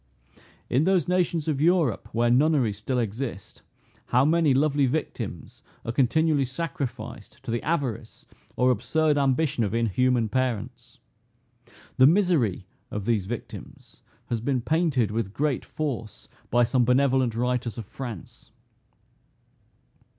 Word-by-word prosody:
In 135 Hz, +6 st, +2 dB
those 185 Hz, -5 st, +2 dB
nations 175 Hz, -3 st, 0 dB
of 145 Hz, -3 st, 0 dB
Europe 165 Hz, -, +2 dB
where 120 Hz, +1 st, +2 dB
nunneries 130 Hz, -6 st, +2 dB
still 125 Hz, +5 st, -2 dB
exist, 115 Hz, -2 st, -4 dB, 0.5 s
how 125 Hz, +2 st, +3 dB
many 160 Hz, -1 st, +3 dB
lovely 140 Hz, 0 st, +2 dB
victims 120 Hz, -, -4 dB, 0.2 s
are 115 Hz, -, -2 dB
continually 140 Hz, +4 st, +2 dB
sacrificed 130 Hz, -6 st, -5 dB
to 130 Hz, -, -4 dB
the 115 Hz, -, -1 dB
avarice 145 Hz, -9 st, -3 dB, 0.3 s
or 125 Hz, 0 st, +3 dB
absurd 150 Hz, +6 st, +1 dB
ambition 135 Hz, -2 st, +1 dB
of 105 Hz, +1 st, -1 dB
inhuman 115 Hz, +1 st, +1 dB
parents! 125 Hz, -2 st, -3 dB, 1.0 s
The 130 Hz, -, +7 dB
misery 160 Hz, -, +2 dB, 0.2 s
of 105 Hz, -2 st, -5 dB
these 105 Hz, -5 st, 0 dB
victims 120 Hz, +1 st, -9 dB, 0.3 s
has 115 Hz, -2 st, -1 dB
been 130 Hz, 0 st, 0 dB
painted 150 Hz, -, +1 dB
with 105 Hz, -3 st, -3 dB
great 145 Hz, -3 st, 0 dB
force 120 Hz, -8 st, -5 dB, 0.2 s
by 120 Hz, +1 st, +3 dB
some 125 Hz, +1 st, +2 dB
benevolent 130 Hz, -1 st, +2 dB
writers 125 Hz, -1 st, -1 dB
of 115 Hz, -, -6 dB
France. 120 Hz, -5 st, -9 dB
130 Hz, 125 wpm, -25 LUFS, 115-150 Hz, 1.0 s, The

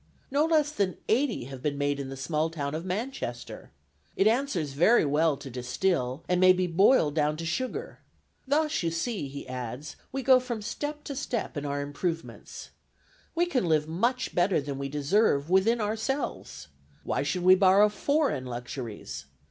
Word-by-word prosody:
No 290 Hz, +3 st, +3 dB
less 310 Hz, -2 st, +2 dB
than 200 Hz, -10 st, -1 dB
eighty 245 Hz, -, +1 dB
have 130 Hz, 0 st, -9 dB
been 145 Hz, 0 st, -1 dB
made 145 Hz, 0 st, 0 dB
in 135 Hz, -1 st, -5 dB
the 135 Hz, -, -7 dB
small 155 Hz, +4 st, -1 dB
town 145 Hz, -3 st, -4 dB
of 160 Hz, +2 st, -3 dB
Manchester. 185 Hz, -, -5 dB, 0.5 s
It 195 Hz, -, +2 dB
answers 220 Hz, -, +1 dB
very 175 Hz, +8 st, +4 dB
well 150 Hz, +1 st, +2 dB
to -, -, -10 dB
distill, 125 Hz, +2 st, -1 dB
and 180 Hz, 0 st, +1 dB
may 185 Hz, 0 st, +8 dB
be 185 Hz, 0 st, 0 dB
boiled 175 Hz, -, +4 dB
down 150 Hz, 0 st, +1 dB
to 165 Hz, -, -5 dB
sugar. 255 Hz, +10 st, -3 dB, 0.5 s
Thus 305 Hz, +2 st, +1 dB
you 170 Hz, -, 0 dB
see," 165 Hz, -, -2 dB
he 140 Hz, 0 st, -8 dB
adds, 125 Hz, +3 st, -6 dB
"we 270 Hz, 0 st, -3 dB
go 260 Hz, 0 st, +6 dB
from 240 Hz, -4 st, -5 dB
step 295 Hz, +6 st, -4 dB
to 280 Hz, -, -6 dB
step 250 Hz, -8 st, -3 dB
in 145 Hz, 0 st, -3 dB
our 145 Hz, 0 st, -2 dB
improvements. 160 Hz, +4 st, -5 dB, 0.6 s
We 345 Hz, +1 st, +3 dB
can 270 Hz, -, 0 dB
live 155 Hz, -2 st, +2 dB
much 235 Hz, +11 st, -1 dB
better 180 Hz, 0 st, +2 dB
than 140 Hz, -1 st, -5 dB
we 140 Hz, 0 st, -3 dB
deserve 150 Hz, +1 st, +1 dB
within 210 Hz, +6 st, +4 dB
ourselves. 220 Hz, -, -3 dB, 0.3 s
Why -, -, -1 dB
should 175 Hz, +6 st, -2 dB
we 185 Hz, +1 st, +8 dB
borrow 195 Hz, +2 st, +6 dB
foreign 240 Hz, -, 0 dB
luxuries? 120 Hz, -, -6 dB
175 Hz, 170 wpm, -28 LUFS, 140-235 Hz, 0.6 s, may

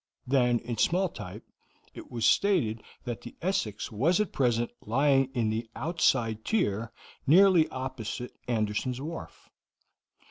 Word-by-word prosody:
Then, 125 Hz, -2 st, +3 dB
in 120 Hz, -2 st, -5 dB
small 185 Hz, +2 st, +2 dB
type, 100 Hz, -, -9 dB, 0.5 s
it -, -, -10 dB
was 115 Hz, -2 st, -2 dB
stated 150 Hz, -, +3 dB, 0.2 s
that 120 Hz, -4 st, -5 dB
the 120 Hz, -, -10 dB
Essex 165 Hz, -, -2 dB
was 150 Hz, -, +2 dB
at 210 Hz, -4 st, -1 dB
present 120 Hz, -3 st, +1 dB
lying 135 Hz, +4 st, +3 dB
in 115 Hz, -3 st, +1 dB
the 115 Hz, +1 st, -3 dB
outside 120 Hz, -7 st, +1 dB
tier 115 Hz, -, 0 dB, 0.4 s
nearly 175 Hz, +1 st, +6 dB
opposite 125 Hz, -2 st, -5 dB
Anderson's 115 Hz, +2 st, -1 dB
wharf. 160 Hz, +4 st, -8 dB
125 Hz, 130 wpm, -28 LUFS, 115-160 Hz, 0.5 s, nearly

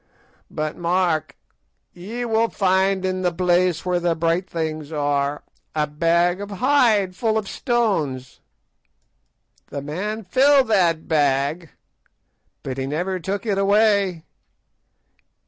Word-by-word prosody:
But 155 Hz, 0 st, -3 dB
mark, 175 Hz, -2 st, 0 dB, 0.6 s
ye 220 Hz, +8 st, -6 dB
will 225 Hz, 0 st, +1 dB
find 190 Hz, 0 st, +1 dB
in 185 Hz, 0 st, -1 dB
the 180 Hz, -1 st, +1 dB
place 180 Hz, -1 st, +1 dB
where 180 Hz, -1 st, +1 dB
the 170 Hz, -1 st, 0 dB
bright 170 Hz, +3 st, 0 dB
things 155 Hz, -2 st, -4 dB
are 145 Hz, -1 st, -1 dB, 0.3 s
a 150 Hz, -1 st, +1 dB
bag 170 Hz, +5 st, +1 dB
of 205 Hz, -, -6 dB
hide 215 Hz, -4 st, +2 dB
full 220 Hz, +1 st, 0 dB
of 215 Hz, -2 st, -3 dB
stones. 165 Hz, -, -1 dB, 1.3 s
The 140 Hz, -, -6 dB
man 205 Hz, +9 st, -4 dB
filled 265 Hz, +6 st, +4 dB
that 170 Hz, -6 st, +2 dB
bag, 145 Hz, +2 st, 0 dB, 0.9 s
but 130 Hz, 0 st, -5 dB
he 135 Hz, -, -2 dB
never 180 Hz, +6 st, -2 dB
took 195 Hz, +5 st, -4 dB
it 200 Hz, -3 st, 0 dB
away. 200 Hz, -4 st, +2 dB
180 Hz, 120 wpm, -22 LUFS, 155-205 Hz, 1.3 s, filled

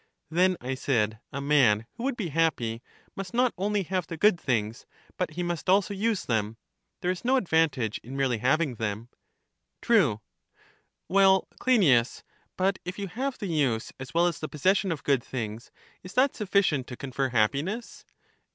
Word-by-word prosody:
Then, 180 Hz, +2 st, +3 dB
I 130 Hz, +1 st, -3 dB
said, 110 Hz, -5 st, 0 dB
a 140 Hz, -, -4 dB
man 130 Hz, -7 st, +3 dB
who 235 Hz, -, -8 dB
would 270 Hz, -3 st, -1 dB
be 190 Hz, -7 st, -3 dB
happy 135 Hz, -8 st, 0 dB, 0.3 s
must 195 Hz, +4 st, -6 dB
not 250 Hz, 0 st, +3 dB
only 200 Hz, +1 st, 0 dB
have 185 Hz, -1 st, -2 dB
the 165 Hz, -, -6 dB
good 205 Hz, 0 st, +4 dB
things, 110 Hz, -3 st, -2 dB, 0.3 s
but -, -, -1 dB
he 175 Hz, +3 st, -3 dB
must 175 Hz, +1 st, -3 dB
also 200 Hz, +2 st, +3 dB
use 210 Hz, +1 st, -1 dB
them; 110 Hz, -1 st, -1 dB, 0.4 s
there 180 Hz, -1 st, +1 dB
is 185 Hz, -, -5 dB
no 255 Hz, +2 st, +3 dB
advantage 160 Hz, -, +1 dB
in 130 Hz, +4 st, -8 dB
merely 130 Hz, -4 st, +1 dB
having 130 Hz, +1 st, +1 dB
them? 110 Hz, +2 st, -4 dB, 0.7 s
True. 165 Hz, -, +3 dB, 0.9 s
Well, 190 Hz, 0 st, +4 dB
Cleinias, 150 Hz, -, +3 dB, 0.3 s
but 190 Hz, +1 st, +1 dB
if 180 Hz, +1 st, -6 dB
you 200 Hz, -2 st, -4 dB
have 260 Hz, +8 st, -3 dB
the 210 Hz, -, -5 dB
use 140 Hz, -, 0 dB
as 130 Hz, -1 st, -8 dB
well 170 Hz, +1 st, +3 dB
as 175 Hz, -3 st, -1 dB
the 155 Hz, -, -5 dB
possession 190 Hz, +5 st, +1 dB
of 160 Hz, -, -4 dB
good 135 Hz, -4 st, +2 dB
things, 115 Hz, -2 st, -5 dB, 0.3 s
is 185 Hz, -, -11 dB
that 265 Hz, +2 st, +3 dB
sufficient 190 Hz, -, +1 dB
to 125 Hz, -, -8 dB
confer 135 Hz, -1 st, -2 dB
happiness? 140 Hz, -, -1 dB
160 Hz, 170 wpm, -27 LUFS, 125-195 Hz, 0.9 s, good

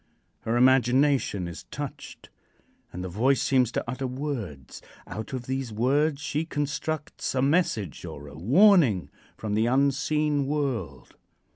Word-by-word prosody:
Her 115 Hz, +2 st, -1 dB
imagination 130 Hz, -5 st, +3 dB
is 85 Hz, -, -9 dB
touched, -, -, -8 dB, 0.6 s
and 90 Hz, -, -6 dB
the -, -, -3 dB
voice 120 Hz, +10 st, +2 dB
seems 125 Hz, -3 st, +2 dB
to -, -, -1 dB
utter 130 Hz, +2 st, -3 dB
words. 125 Hz, -, -5 dB, 0.2 s
Out 110 Hz, 0 st, -7 dB
of 130 Hz, -2 st, -4 dB
these 130 Hz, -2 st, -3 dB
words 140 Hz, +7 st, +1 dB
she 150 Hz, +2 st, -1 dB
constructs 150 Hz, -1 st, -3 dB
a 130 Hz, -, +2 dB
message 140 Hz, -, 0 dB
or 70 Hz, 0 st, -8 dB
a -, -, -11 dB
warning 135 Hz, -, +4 dB, 0.3 s
from 110 Hz, -2 st, -4 dB
the 110 Hz, +2 st, +2 dB
unseen 140 Hz, +2 st, +1 dB
world. 130 Hz, -, -3 dB
130 Hz, 135 wpm, -26 LUFS, 110-145 Hz, 0.6 s, warning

